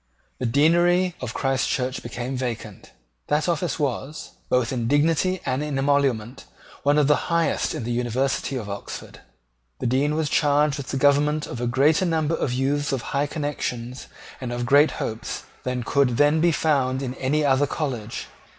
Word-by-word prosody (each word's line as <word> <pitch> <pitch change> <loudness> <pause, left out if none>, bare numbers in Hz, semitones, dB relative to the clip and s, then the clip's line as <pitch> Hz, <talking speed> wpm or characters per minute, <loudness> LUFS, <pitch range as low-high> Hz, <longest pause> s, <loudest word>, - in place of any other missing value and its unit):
The 125 - -1
Deanery 175 +7 +3
of 125 -3 -5
Christchurch 130 -1 0
became 120 +2 -5
vacant. 115 -5 -5 0.4
That 150 +2 +1
office 175 0 -1
was, 145 +1 -3 0.2
both 125 -1 +1
in 120 -3 -1
dignity 165 +6 +2
and 130 +1 0
in 150 -2 -3
emolument, 135 -3 0 0.4
one 145 +1 +3
of 150 - +4
the 150 +4 +1
highest 170 -1 +1
in - - -4
the 120 - -3
University 125 +3 -1
of 115 -5 -4
Oxford. 100 0 -7 0.6
The - - -5
Dean 135 +5 +1
was 160 -1 0
charged 145 -1 +2
with 140 -2 -6
the 135 - -2
government 145 +2 +3
of 120 - -6
a 120 - 0
greater 150 +9 +3
number 160 -1 0
of 135 - -1
youths 140 +3 0
of 135 0 -3
high 140 +1 +1
connections 130 -5 -4 0.3
and 125 -2 -4
of 120 0 -2
great 145 +4 +5
hopes 110 0 -4 0.2
than 125 -1 -2
could 125 -1 +2
then 145 +2 +4
be 170 0 +4
found 140 -5 +1
in 125 -1 -3
any 145 +3 0
other 140 +1 +3
college. 125 -8 -4
140 Hz, 170 wpm, -24 LUFS, 125-150 Hz, 0.6 s, great